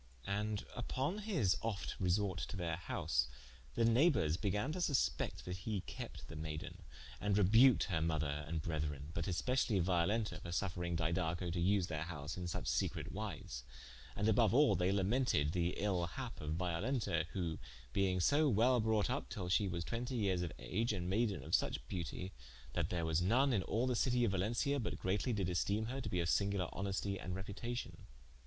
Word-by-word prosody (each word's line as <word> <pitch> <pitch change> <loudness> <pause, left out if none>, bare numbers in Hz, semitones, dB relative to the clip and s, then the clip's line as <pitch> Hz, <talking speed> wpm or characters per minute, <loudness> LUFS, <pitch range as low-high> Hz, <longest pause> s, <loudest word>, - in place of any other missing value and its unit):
And 105 +1 -1
vpon 135 - -2
his 165 - +1
ofte 110 -3 -2
resorte 95 0 +1
to 95 - -6
their 85 -2 -2
house, 75 -6 0 0.5
the 115 - +3
neighbours 115 - +4
began 105 - -1
to 180 +3 -3
suspect 130 - 0
that 90 0 -4
he 100 0 -2
kept - - -8
the 80 - -9
mayden, 80 +3 -5 0.4
and 100 +1 +1
rebuked 115 +6 +6
her 85 -5 -1
mother 75 -2 0
and 80 -1 -2
brethren, 75 -3 -3
but 85 +2 -2
specially 125 0 +1
Violenta, 95 +5 +1
for 85 - -6
suffering 90 -2 -1
Didaco 85 +1 0
to 90 - -1
vse 95 +1 +3
their 80 -2 -3
house 75 -3 -5
in 90 - -4
suche 85 - -3
secrete - - -1
wise: - - -5 0.5
and 105 - 0
aboue 115 +6 +5
al - - +4
they 90 +3 +2
lamented 100 - +2
the 85 0 0
ill 95 -4 0
happe 80 - -6
of 75 +1 -2
Violenta, 90 - 0
who 85 -5 -2 0.3
being 95 -2 +2
so 145 - +4
wel 120 +3 +4
brought 110 -2 +2
vp 135 +3 -2
till 90 -3 -4
she 100 +2 +3
was 85 -2 -3
twentie 120 +2 -3
yeares 95 -4 +1
of 85 -3 -2
age, 110 +4 -1
and 90 -2 -2
maiden 105 -1 +1
of - - -8
such - - +1
beautie, 90 +1 -4 0.4
that - - 0
there 85 -2 -1
was 80 +1 +2
none 125 +9 +3
in 100 - +2
all 115 +6 0
the 125 -1 +1
citie 125 0 +2
of 105 - +1
Valencia 115 +9 +1
but 115 - -3
greatly 100 +7 0
did 100 -6 0
esteme 100 +5 0
her 135 +2 -3
to - - -4
be 90 - 0
of 85 - +1
singuler 100 +2 +1
honestie 100 0 -2
and 90 0 -3
reputation. 110 +6 -5
95 Hz, 185 wpm, -37 LUFS, 85-115 Hz, 0.5 s, rebuked